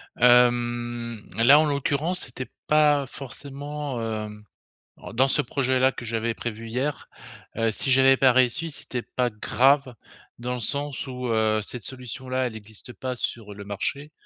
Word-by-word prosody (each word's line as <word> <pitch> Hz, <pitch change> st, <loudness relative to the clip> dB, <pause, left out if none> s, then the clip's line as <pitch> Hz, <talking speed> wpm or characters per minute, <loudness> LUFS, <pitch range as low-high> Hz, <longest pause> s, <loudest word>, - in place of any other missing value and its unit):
Hem, 120 Hz, -2 st, +2 dB
là, 135 Hz, +6 st, +7 dB
en 155 Hz, -, +3 dB
l'occurrence, 145 Hz, +5 st, 0 dB
c'était 130 Hz, +1 st, -6 dB, 0.2 s
pas 150 Hz, -2 st, +4 dB
forcément, 140 Hz, +1 st, -6 dB
hem 105 Hz, -1 st, -5 dB, 0.6 s
alors, -, -, -10 dB
dans 130 Hz, +3 st, +4 dB
ce 140 Hz, -, +2 dB
projet 130 Hz, -1 st, 0 dB
là 130 Hz, +1 st, +5 dB
que 125 Hz, -, -9 dB
j'avais 115 Hz, 0 st, -1 dB
prévu 115 Hz, -1 st, -6 dB
hier, 130 Hz, +5 st, -3 dB, 0.5 s
heu, 115 Hz, 0 st, +1 dB
si 135 Hz, -, 0 dB
j'avais 135 Hz, 0 st, +6 dB
pas 130 Hz, -2 st, +5 dB
réussi, 130 Hz, +6 st, +2 dB
c'était 130 Hz, -3 st, -4 dB
pas 125 Hz, 0 st, -1 dB
grave 130 Hz, +5 st, +2 dB, 0.4 s
dans 125 Hz, +1 st, -3 dB
le 125 Hz, -, -4 dB
sens 140 Hz, +4 st, -2 dB
où, 125 Hz, -1 st, -5 dB
heu, 110 Hz, -1 st, +2 dB
cette 120 Hz, +3 st, -7 dB
solution 130 Hz, +2 st, -6 dB
là, 130 Hz, 0 st, 0 dB
elle 115 Hz, -3 st, -5 dB
existe 110 Hz, +3 st, -11 dB
pas 125 Hz, +3 st, -5 dB
sur 110 Hz, -3 st, -4 dB
le 100 Hz, 0 st, -9 dB
marché 125 Hz, +9 st, -3 dB
125 Hz, 165 wpm, -25 LUFS, 115-135 Hz, 0.6 s, là